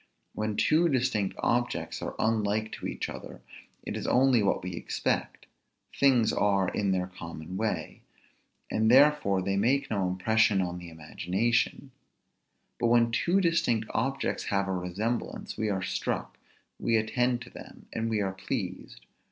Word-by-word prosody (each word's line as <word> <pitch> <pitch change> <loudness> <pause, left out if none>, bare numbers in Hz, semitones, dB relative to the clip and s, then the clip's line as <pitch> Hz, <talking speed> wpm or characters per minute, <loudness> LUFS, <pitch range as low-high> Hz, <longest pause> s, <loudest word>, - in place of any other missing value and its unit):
When 110 0 -2
two 165 +2 +3
distinct 125 -7 0
objects 120 +1 0
are - - -4
unlike 110 -1 0
to - - -5
each - - -4
other, - - -9 0.4
it - - -5
is - - -4
only 130 -2 +4
what 100 - +1
we 90 0 -4
expect; 85 - -2 0.5
things 130 -5 +4
are 100 -2 +2
in 100 -1 -1
their 90 -1 +1
common 85 -1 -8
way; 95 -6 -3 0.7
and 110 0 +2
therefore 130 -8 +5
they 100 +1 0
make 130 +7 +1
no 100 -3 +1
impression 105 +3 +2
on 90 -1 -2
the 85 -1 -9
imagination: 95 - -1 0.9
but 120 - +2
when 115 0 +4
two 175 +10 +2
distinct 165 - +1
objects 135 +2 -1
have 100 -1 0
a - - -1
resemblance, 95 +7 -3
we 110 0 -1
are 95 -2 -1
struck, 90 - -3 0.4
we 115 -1 +2
attend 120 +3 0
to - - -14
them, - - -12
and 115 0 -1
we 110 -2 0
are 95 -1 -1
pleased. 95 - -5
110 Hz, 150 wpm, -28 LUFS, 95-120 Hz, 0.9 s, therefore